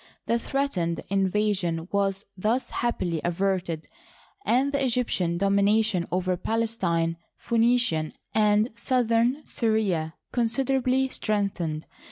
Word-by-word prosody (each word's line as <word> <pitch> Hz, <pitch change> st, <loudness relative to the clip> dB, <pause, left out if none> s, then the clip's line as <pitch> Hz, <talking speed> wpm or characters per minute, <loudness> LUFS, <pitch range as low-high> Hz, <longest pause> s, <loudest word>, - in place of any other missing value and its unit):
The 235 Hz, -, +1 dB
threatened 220 Hz, -12 st, -1 dB
invasion 190 Hz, -4 st, 0 dB
was 195 Hz, 0 st, 0 dB
thus 220 Hz, +7 st, -1 dB
happily 180 Hz, -9 st, -1 dB
averted, 175 Hz, -2 st, -1 dB, 0.6 s
and 260 Hz, +4 st, +2 dB
the 280 Hz, -1 st, 0 dB
Egyptian 225 Hz, -9 st, +1 dB
domi 200 Hz, +2 st, +2 dB
nation 205 Hz, -3 st, +2 dB
over 185 Hz, 0 st, 0 dB
Palestine, 180 Hz, -7 st, 0 dB, 0.2 s
Phoenicia, 230 Hz, -9 st, +2 dB, 0.2 s
and 210 Hz, +1 st, +3 dB
southern 240 Hz, +3 st, +1 dB
Syria 200 Hz, -9 st, 0 dB, 0.2 s
con 240 Hz, -2 st, +1 dB
siderably 265 Hz, +2 st, +1 dB
strengthened. 195 Hz, -7 st, -1 dB
210 Hz, 105 wpm, -26 LUFS, 175-235 Hz, 0.6 s, and